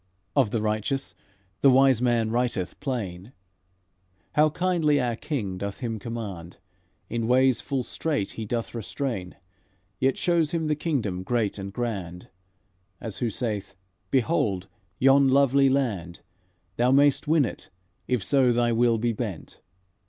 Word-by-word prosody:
Of 135 -7 +3
the 110 0 -1
righteous, 110 +1 -1 0.5
the 140 - +6
Wise 130 -2 +5
Man 120 -3 +1
writeth 120 -6 -1
plain 110 - -4 1.0
How 155 +1 +4
kindly 160 -3 +1
our 120 -2 0
King 110 -9 -4
doth 100 0 -4
him 115 -3 -3
command; 100 -7 -6 0.5
In 115 -1 -2
ways 130 0 +3
full 135 -3 -2
strait 145 -6 -2
he 110 - -6
doth 115 +2 -3
restrain, 115 -4 -4 0.6
Yet 130 0 +2
shows 170 -3 +1
him 165 -1 -1
the 155 0 +1
kingdom 130 - -2
great 105 0 -1
and 100 0 -6
grand, 95 -7 -4 0.7
As 110 -4 -5
who 120 - 0
saith: 105 -4 -3 0.3
'Behold! 115 - +1 0.3
yon 135 +2 +5
lovely 135 0 +4
land! 105 -11 -1 0.6
Thou 120 +1 +3
may'st 140 +2 +4
win 155 -2 +4
it, - - -7 0.4
if 125 -6 0
so 130 +3 +3
thy 120 0 +2
will 115 0 +3
be 115 +1 0
bent.' 105 -6 -6
120 Hz, 140 wpm, -26 LUFS, 105-135 Hz, 1.0 s, the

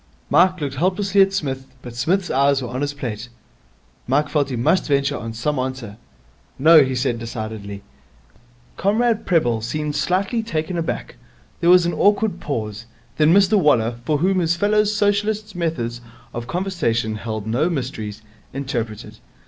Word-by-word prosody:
Mike 185 +1 +4
looked 140 -2 -4
helplessly 195 +4 +2
at 195 0 +4
Psmith, 135 -8 -3 0.2
but 120 - -8
Psmith's 175 +10 0
eyes 140 +1 +3
were 125 -3 -5
on 125 +2 -4
his 145 0 -1
plate. 120 -5 -6 0.8
Mike 145 +3 +1
felt 145 -3 0
he 130 - -3
must 125 +10 +1
venture 140 -1 +1
on 115 0 -5
some 130 +6 -2
answer. 130 -5 -4 0.6
'No,' 155 +2 +7
he 130 -1 -2
said 125 -2 -1
decidedly. 110 -3 -6 0.9
Comrade 220 +3 +1
Prebble 120 -11 +2
seemed 150 +6 -3
slightly 195 +6 0
taken 170 -5 -3
aback. 165 - -4 0.4
There 170 - +2
was 180 -1 +7
an 170 - 0
awkward 205 -2 +2
pause. 110 -5 -4 0.3
Then 155 +1 +4
Mr 200 +2 +5
Waller, 120 -7 +2
for 150 +4 +1
whom 185 +5 +1
his 170 -1 +1
fellow 210 +3 +2
Socialist's 210 +1 0
methods 125 -9 -3 0.3
of 120 0 -5
conversation 130 - -1
held 110 -1 -5
no 125 +10 +1
mysteries, 110 -8 -4 0.3
interpreted. 120 -6 -5
145 Hz, 155 wpm, -21 LUFS, 120-185 Hz, 0.9 s, No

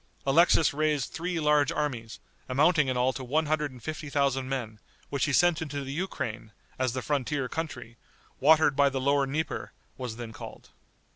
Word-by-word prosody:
Alexis 160 +2 +4
raised 150 -3 0
three 175 0 -3
large 150 0 +3
armies, 130 -8 -3 0.3
amounting 150 +3 +3
in 130 -1 0
all 125 +1 +2
to 130 - -6
one 155 +6 +1
hundred 150 -1 0
and 125 -3 -14
fifty 155 +1 -5
thousand 135 -2 0
men, 115 -6 -4 0.3
which 140 - +1
he 145 - -1
sent 175 +3 +3
into 145 -2 -4
the 135 0 -5
Ukraine, 120 - -4 0.3
as 130 -2 0
the 130 - -3
frontier 140 -2 -1
country, 125 -7 -6 0.4
watered 155 0 +5
by 140 0 +4
the 135 -1 -3
lower 140 +1 +2
Dnieper, 155 +4 -3 0.3
was 125 -3 -4
then 115 -1 -7
called. - - -10
140 Hz, 180 wpm, -28 LUFS, 130-155 Hz, 0.4 s, watered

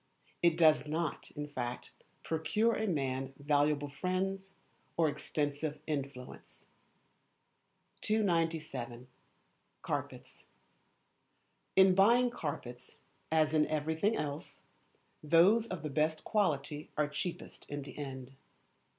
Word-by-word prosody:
It 170 -1 +4
does 155 -2 +5
not, 160 +1 -2
in 150 0 -3
fact, 125 -4 -5 0.3
procure 210 +8 +1
a 220 0 -1
man 135 -5 -1
valuable 145 0 +1
friends, 190 +4 -2 0.4
or 165 -1 +4
extensive 145 0 -2
influence. 140 -4 -6 1.4
297. 165 - 0 0.8
Carpets. - - -5 1.3
In 190 -1 +7
buying 235 +6 +5
carpets, 135 - -6 0.4
as 155 -1 +3
in 155 -1 +4
everything 160 +7 0
else, 145 0 -5 0.6
those 180 +9 +5
of 185 -7 -5
the 150 - -2
best 155 +2 +1
quality 150 -8 0
are 150 -1 +2
cheapest 155 +4 -6
in 145 -1 -4
the 140 - -10
end. 135 -2 -7
155 Hz, 100 wpm, -33 LUFS, 145-180 Hz, 1.4 s, In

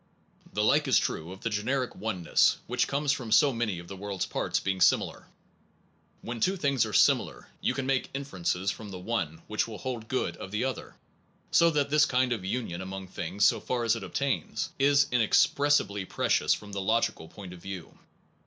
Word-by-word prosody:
The - - +1
like - - +3
is - - +5
true 80 +3 -2
of 95 - -10
the 115 - -2
generic 125 +5 -1
oneness 95 -6 +2
which 125 -1 0
comes 140 0 0
from 130 -6 -3
so 135 +5 +5
many 115 -5 -1
of 85 0 -9
the 95 - -7
world 100 -1 -6
s - - +3
parts - - -1
being 95 -1 -2
similar. - - +2 1.0
When 120 0 -5
two 190 - +1
things 140 -8 +1
are - - -6
similar - - +2
you - - 0
can 135 - -2
make 135 -1 0
inferences 95 -8 -2
from 110 -2 -9
the 95 - -7
one 90 -5 -3
which 105 +1 -1
will 110 -2 -7
hold 120 -3 -5
good 130 - -2
of - - -8
the 105 +4 -1
other, 130 -1 -4 0.6
so 170 - +5
that 145 -3 0
this 150 0 +5
kind 125 -1 +2
of 110 -6 -5
union 95 -4 -3
among 95 0 -7
things, 95 +4 -1
so - - +4
far 125 -1 -2
as 115 0 +3
it 115 - -6
obtains, 135 +8 -2
is 140 +1 +5
inexpres 125 +4 +3
sibly 100 0 -3
precious - - +1
from 105 -1 -11
the 100 -1 -3
logical 110 -5 0
point 95 +1 -10
of 90 - -11
view. 95 -3 -8
110 Hz, 200 wpm, -28 LUFS, 95-130 Hz, 1.0 s, is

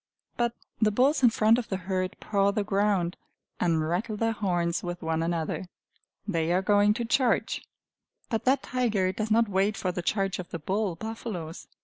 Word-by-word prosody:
But 235 -1 0 0.3
the 215 - +5
bulls 260 +8 +3
in 245 - +7
front 225 +1 +4
of 240 - -6
the 190 - -1
herd 185 0 -2
paw 200 -1 +1
the 205 +1 0
ground, 195 -3 +1 0.4
and 160 -3 +1
rattle 200 +6 -1
their 225 +1 +1
horns 175 -6 0
with 175 -1 -5
one 160 0 0
another. 165 +2 -2 0.6
They 165 -4 0
are 185 +2 +2
going 205 +1 +4
to 235 - -2
charge! 240 0 +1 0.7
But 225 -2 -2
that 265 +2 +3
tiger 220 -7 +1
does 215 +3 -3
not 230 +1 +4
wait 200 +2 +1
for 185 - -1
the 180 - -3
charge 195 +1 0
of 180 - -6
the - - -4
bull 190 +3 -1
buffaloes. 195 -5 -6
200 Hz, 185 wpm, -27 LUFS, 175-220 Hz, 0.7 s, in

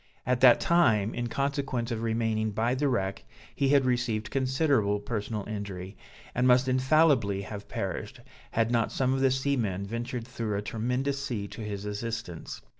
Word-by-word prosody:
At 125 -1 +1
that 125 -2 +8
time, 115 -12 +3
in 120 0 -2
consequence 135 -2 -2
of 115 -1 -2
remaining 110 -1 0
by 115 +4 +1
the 140 +2 +1
wreck, 95 -6 -1 0.3
he 140 - +1
had 140 -2 +4
received 120 -4 0
considerable 130 -6 +1
personal 105 0 -4
injury, 100 -2 -6 0.4
and 125 +1 +2
must 125 +1 +5
infallibly 130 -6 +3
have 100 +1 -8
perished, - - -4 0.3
had 115 0 +1
not 115 -2 +1
some 130 0 +1
of 135 - 0
the 135 0 +4
seamen 125 -8 0
ventured 115 +2 -4
through 115 -4 -3
a - - -1
tremendous 125 +6 -1
sea 110 -7 -3
to - - -8
his 105 -1 -5
assistance. 105 -4 -5
115 Hz, 165 wpm, -28 LUFS, 105-130 Hz, 0.4 s, that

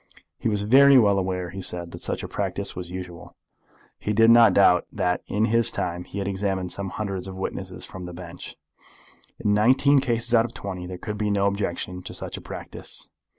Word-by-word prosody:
He - - 0
was 105 -1 -1
very 135 +5 +7
well 100 -5 +4
aware, 90 -2 -3
he 95 +2 -6
said, 85 -2 -2
that - - -9
such - - -2
a - - -4
practice - - -3
was 90 -1 -6
usual. 90 -3 -8 0.6
He 105 - -2
did 115 +2 +6
not 115 0 +7
doubt 90 -3 +5
but - - -15
that 90 0 0
in 105 +2 +1
his 115 0 +3
time 90 +1 -3
he 100 - -9
had 100 -1 -2
examined 95 -2 -2
some 100 -1 -4
hundreds 95 -2 -4
of 95 - -7
witnesses 95 - -5
from 95 -1 -9
the 90 - -7
bench. 85 -1 -9 0.8
In 105 - +1
nineteen 130 +6 +4
cases 120 -3 0
out 115 -1 +5
of 120 - -9
twenty 90 -3 -6
there 90 0 -6
could 105 +3 -6
be 105 -1 0
no 100 -1 +1
objection 95 -2 -2
to - - -8
such - - -5
a - - -8
practice. - - -8
100 Hz, 210 wpm, -24 LUFS, 90-110 Hz, 0.8 s, very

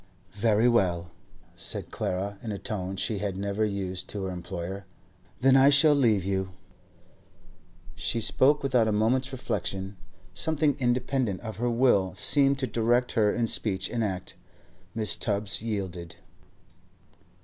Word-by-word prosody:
'Very 110 +3 +2
well,' 90 -8 +1 0.4
said 85 - -6
Clara, 100 +2 -3
in 110 - -5
a 100 - -4
tone 95 -1 -4
she 100 +1 -2
had 100 -2 -3
never 100 +2 -1
yet 105 -2 -1
used 90 0 -5
to 100 -2 -5
her 95 - -3
employer, 90 +2 -6 0.6
'then 135 +1 +5
I 135 +1 +7
shall 145 +2 +6
leave 110 -9 +2
you.' 95 -1 -2 1.4
She 85 +6 -2
spoke 140 +6 +2
without 125 -5 +2
a - - +1
moment's 120 +5 +1
reflection; 95 -6 -4 0.4
something 150 - +1
independent 125 -4 0
of 110 -4 -7
her 120 +2 0
will 115 -6 +2
seemed 140 -1 +3
to 135 - -1
direct 120 +1 +1
her 105 -3 +2
in 120 - 0
speech 95 -4 +1
and 115 -1 -1
act. 95 -3 -4 0.6
Mrs. 110 -1 +2
Tubbs 105 -1 0
yielded. 95 -6 -5
105 Hz, 145 wpm, -27 LUFS, 95-125 Hz, 1.4 s, I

